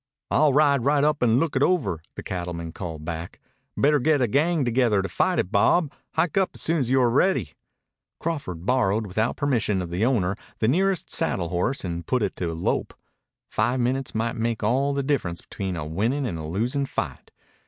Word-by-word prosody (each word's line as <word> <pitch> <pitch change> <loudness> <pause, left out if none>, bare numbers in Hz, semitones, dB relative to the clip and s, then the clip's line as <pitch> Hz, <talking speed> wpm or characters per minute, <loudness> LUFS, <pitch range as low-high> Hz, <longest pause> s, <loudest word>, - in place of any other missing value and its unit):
"I'll 150 0 +4
ride 140 -2 +4
right 145 +1 +3
up 150 0 +2
and 120 0 +4
look 165 -2 -1
it 130 - +1
over," 145 - +1
the - - -7
cattleman 85 -2 -4
called 80 -3 -7
back. 85 0 -6 0.4
"Better 150 +1 +4
get 150 +2 +3
a 125 - +2
gang 150 +5 +2
together 120 -5 +2
to - - -2
fight 90 - +1
it, 90 - -1
Bob. 140 - +3 0.2
Hike 170 +2 0
up 190 - -1
soon 165 +1 +1
as 125 -4 -1
you're 130 -2 +3
ready." 130 - +2 0.7
Crawford 115 - -4
borrowed 110 -3 +2
without 110 +4 -1
permission 120 -8 +1
of 90 -2 -4
the 90 +5 -1
owner 105 -7 +2 0.2
the 110 - +1
nearest 185 +7 +1
saddle 85 -4 0
horse 90 +10 -1
and 85 -1 -4
put 125 -3 +1
it 100 - -2
to 85 -2 -2
a 80 - -6
lope. 85 - -1 0.5
Five 120 +4 0
minutes 130 +1 -1
might 115 +1 -1
make 115 -1 -2
all 135 +6 +1
the 140 - 0
difference 125 -12 -1
between 95 -3 -5
a 80 -3 -4
winning 115 - -1
and 85 -9 -3
a 80 - -5
losing 120 - -1
fight. - - -4
120 Hz, 195 wpm, -25 LUFS, 90-140 Hz, 0.7 s, I'll